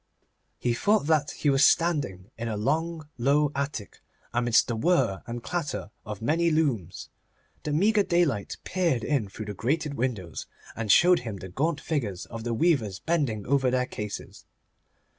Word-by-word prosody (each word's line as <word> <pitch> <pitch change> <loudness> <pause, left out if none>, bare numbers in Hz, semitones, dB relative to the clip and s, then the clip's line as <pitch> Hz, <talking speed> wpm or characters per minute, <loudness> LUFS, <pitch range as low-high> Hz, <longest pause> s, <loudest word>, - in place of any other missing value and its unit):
He 120 - 0
thought 205 - +2
that 150 -2 +2
he 145 - 0
was 135 +1 +4
standing 135 - +2
in 115 +1 -4
a 110 -2 -2
long, 155 +7 -1
low 145 +4 +3
attic, 140 -7 -4 0.3
amidst 120 -1 +3
the 120 - -1
whir 110 - +2
and 120 0 -5
clatter 150 - -3 0.2
of 105 0 -6
many 165 +6 +2
looms. 135 - -1 0.5
The 150 - -3
meagre 205 +8 +3
daylight 170 - +1
peered 170 -10 0
in 135 -9 0
through 110 +2 -7
the 105 - -5
grated 145 - -1
windows, 115 - -3 0.3
and 110 -3 0
showed 180 - +6
him 110 -5 -6
the 95 0 -8
gaunt 150 - 0
figures 115 - -3
of 115 -1 -7
the 120 0 -1
weavers 115 - +2
bending 140 - -1
over 135 -1 +2
their 125 0 +1
cases. 105 -4 -7
135 Hz, 160 wpm, -27 LUFS, 110-160 Hz, 0.5 s, showed